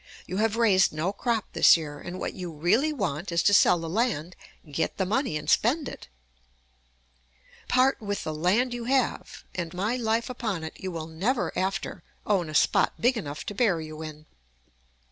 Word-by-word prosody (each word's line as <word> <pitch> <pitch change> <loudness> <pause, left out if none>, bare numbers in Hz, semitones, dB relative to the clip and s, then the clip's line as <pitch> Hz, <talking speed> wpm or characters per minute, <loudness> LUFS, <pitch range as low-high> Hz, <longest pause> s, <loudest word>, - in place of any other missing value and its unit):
You 185 - -4
have 220 +1 +1
raised 200 -5 +4
no 160 +6 -2
crop 225 0 -1
this - - +7
year, 145 -3 -7
and 175 +4 -7
what - - -3
you 180 -2 -6
really 195 - +2
want 180 - -3
is 170 - +1
to 205 - +4
sell 185 - +6
the 165 -1 -5
land, 185 -4 -1 0.4
get 145 - -1
the 190 - 0
money, 215 - 0
and 150 - -8
spend 275 +6 +2
it. - - -9 1.6
Part 255 +1 +3
with 205 -1 -3
the 155 - -3
land 195 +11 +1
you 240 -1 -5
have, 265 +1 -1
and, 170 -2 -4
my 210 +7 0
life 230 -1 0
upon 220 -9 -3
it, 160 - -6
you 190 - -4
will 165 -3 -5
never 195 +11 -1
after 190 +1 -2 0.2
own 185 -6 +1
a 155 - -6
spot - - +3
big 245 +2 +3
enough 150 -9 -5
to - - -4
bury 190 -8 +1
you 155 0 -9
in. 155 -1 -8
190 Hz, 185 wpm, -27 LUFS, 160-230 Hz, 1.6 s, this